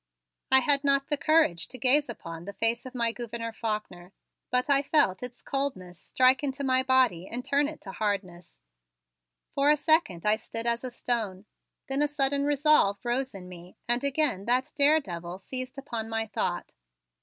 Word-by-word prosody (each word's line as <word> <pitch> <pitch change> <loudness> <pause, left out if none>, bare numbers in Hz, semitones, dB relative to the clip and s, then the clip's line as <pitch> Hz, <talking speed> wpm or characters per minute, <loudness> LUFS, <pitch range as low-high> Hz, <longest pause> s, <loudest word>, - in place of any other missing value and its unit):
I 265 0 +6
had 280 +1 +2
not 275 -1 +2
the 295 - +2
courage 285 - +2
to 255 - -10
gaze 265 +3 +3
upon 165 -7 -8
the 200 - -7
face 230 +5 -1
of 255 - -11
my 235 -1 +1
Gouverneur 230 -1 -5
Faulkner, 210 -5 -5 0.4
but 250 +2 +1
I 280 -1 +4
felt 280 -10 +2
its 250 0 -8
coldness 190 -11 -3
strike 255 +2 +2
into 280 0 -3
my 260 -1 +3
body 255 -9 +2
and 245 +2 -5
turn 285 +1 +2
it 310 +1 -9
to 195 - -8
hardness. 185 -5 -4 0.9
For 280 +1 +2
a 300 - +5
second 290 - +1
I 210 +1 +3
stood 230 +1 -5
as 235 +1 0
a 255 - -4
stone, 220 -6 -3 0.4
then 270 +1 -1
a 295 - +3
sudden 280 -1 0
resolve 290 -8 +3
rose 255 0 -1
in 180 -2 -9
me 180 0 -12
and 240 +2 +2
again 280 -8 0
that 250 +3 0
daredevil 190 - +1
seized 255 +7 -5
upon 235 -5 -5
my 225 0 -1
thought. 215 - -3
245 Hz, 180 wpm, -27 LUFS, 200-275 Hz, 0.9 s, I